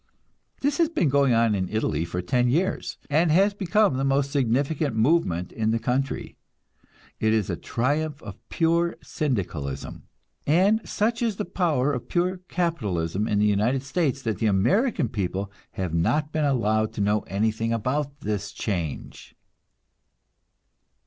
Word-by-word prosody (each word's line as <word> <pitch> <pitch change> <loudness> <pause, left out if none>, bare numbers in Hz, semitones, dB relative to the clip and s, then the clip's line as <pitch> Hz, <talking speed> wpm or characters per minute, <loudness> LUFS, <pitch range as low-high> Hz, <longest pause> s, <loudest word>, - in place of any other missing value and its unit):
This 285 +2 0
has 330 -2 +4
been 315 - +1
going 140 -1 +3
on 115 -1 +3
in 95 -2 -1
Italy 110 -6 -1
for 90 +1 -4
ten 120 +6 +2
years, 175 +9 -1
and 160 +3 +2
has 195 +6 +4
become 200 -5 +2
the 135 - -1
most 135 0 +1
significant 140 +1 0
movement 110 - +1
in 110 -1 -1
the 115 - +2
country. 125 +4 -2 0.8
It 110 0 +2
is 110 -4 +1
a - - -1
triumph 145 +4 -1
of 100 -3 -9
pure 170 +1 +1
Syndicalism; 85 - -3 0.4
and 190 +9 +4
such 230 +3 0
is 230 -4 0
the 210 - -3
power 145 -6 +1
of 125 - -5
pure 180 +1 0
capitalism 105 - -1
in 105 - +1
the 105 - +3
United 110 +6 +1
States 140 -2 -1
that 110 -5 -2
the 110 - +1
American 130 - +2
people 100 -1 -3 0.2
have 90 -4 -3
not 150 - +1
been 155 -1 0
allowed 110 -5 +1
to - - -3
know 105 +1 +2
anything 110 +4 0
about 140 +5 -2
this 105 -3 -3
change. 90 -9 -5
130 Hz, 150 wpm, -25 LUFS, 105-160 Hz, 0.8 s, has